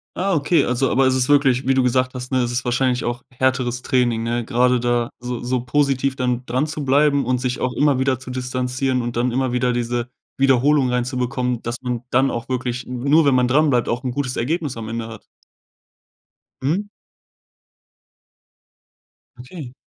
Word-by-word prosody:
Ah, 195 +1 0
okay, 160 +2 +2
also 125 +1 0
aber 135 +1 +3
es 130 - +3
ist 130 0 0
wirklich, 135 -3 +3
wie 135 - +3
du 130 - +3
gesagt 130 +1 +1
hast, 125 +1 -6
ne? 130 - +2
Es 120 -1 -1
ist 120 +2 -2
wahrscheinlich 125 0 0
auch 120 0 -3
härteres 125 -1 -1
Training, 120 -3 +1
ne, 120 +1 -1
grade 125 +2 +2
da 120 0 0
so 125 0 -4
so 125 0 -1
positiv 135 0 +1
dann 125 -1 -1
dranzubleiben 140 +1 +1
und 125 +1 +1
sich 125 0 -2
auch 125 -1 -1
immer 145 -3 +2
wieder 130 -1 +1
zu 130 0 -9
distanzieren 130 0 -1
und 120 0 -4
dann 120 +1 +1
immer 130 0 0
wieder 125 0 +1
diese 120 0 -2 0.3
Wiederholung 135 +1 +3
reinzubekommen, 125 0 -1
dass 120 +1 -4
man 125 -2 -2
dann 130 +2 +2
auch 115 +1 -5
wirklich 125 -1 -3
nur, 140 +6 +2
wenn 140 -2 +4
man 125 -1 +3
dranbleibt, 140 -2 +2
auch 120 +1 -2
'n 125 - -2
gutes 125 -1 -3
Ergebnis 150 0 -2
am 110 -1 -6
Ende 115 0 -4
hat. 115 -2 -10 1.4
Mhm. 180 +10 -1 2.5
Okay. 125 0 -9
125 Hz, 175 wpm, -21 LUFS, 120-135 Hz, 2.5 s, wenn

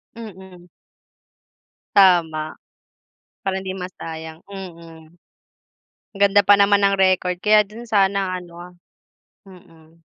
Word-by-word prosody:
Mm. 190 -5 -12 1.3
Tama, 165 -5 +3 0.8
para 190 0 -2
hindi 190 0 -6
masayang, 160 -3 -8
mm. 170 -4 -12 0.9
Ganda 200 0 +3
pa 205 +1 +5
naman 200 0 +4
ng 195 - +3
record, 185 -2 +1
kaya 210 0 +4
din 225 +3 -12
sana 195 -2 +1
ano, 175 0 -12 0.7
mm. 165 -3 -19
185 Hz, 95 wpm, -20 LUFS, 170-200 Hz, 1.3 s, pa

